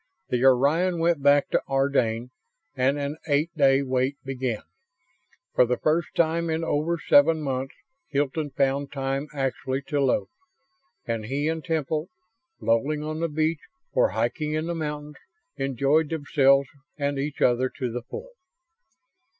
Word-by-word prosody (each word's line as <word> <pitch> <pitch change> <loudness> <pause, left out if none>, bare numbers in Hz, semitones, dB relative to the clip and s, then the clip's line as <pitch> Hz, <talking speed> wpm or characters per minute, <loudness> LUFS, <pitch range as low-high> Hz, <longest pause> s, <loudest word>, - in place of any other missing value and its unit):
The 125 0 0
Orion 145 +8 +4
went 165 -2 +1
back 145 +1 +4
to - - +2
Ardane 125 -4 +1 0.4
and 135 +2 +2
an 145 +1 -3
eight 150 +3 +1
day 135 -2 +4
wait 130 +1 0
began. 130 -4 -3 0.9
For - - +5
the 125 0 0
first 155 +2 0
time 170 0 +1
in 160 +1 -1
over 165 +2 0
seven 160 +1 +4
months 135 -1 -3 0.3
Hilton 145 +2 -1
found 140 +1 0
time 135 +1 -2
actually 135 -1 -2
to 145 -1 +1
loaf; 135 -2 +1 0.8
and 115 -2 -3
he 140 +6 -1
and 160 -1 -2
Temple, 155 0 -1 0.5
lolling 140 +7 +1
on 155 +1 -4
the 165 0 0
beach 155 +1 0 0.3
or - - +3
hiking 155 -1 -1
in 155 +1 -1
the 170 - -2
mountains, 150 -2 -5 0.4
enjoyed 140 +4 +1
themselves 140 -3 +3 0.3
and 140 -1 -1
each 145 +1 -3
other 125 +1 +3
to 125 -3 -4
the 120 +1 -4
full. - - -9
145 Hz, 145 wpm, -25 LUFS, 135-155 Hz, 0.9 s, For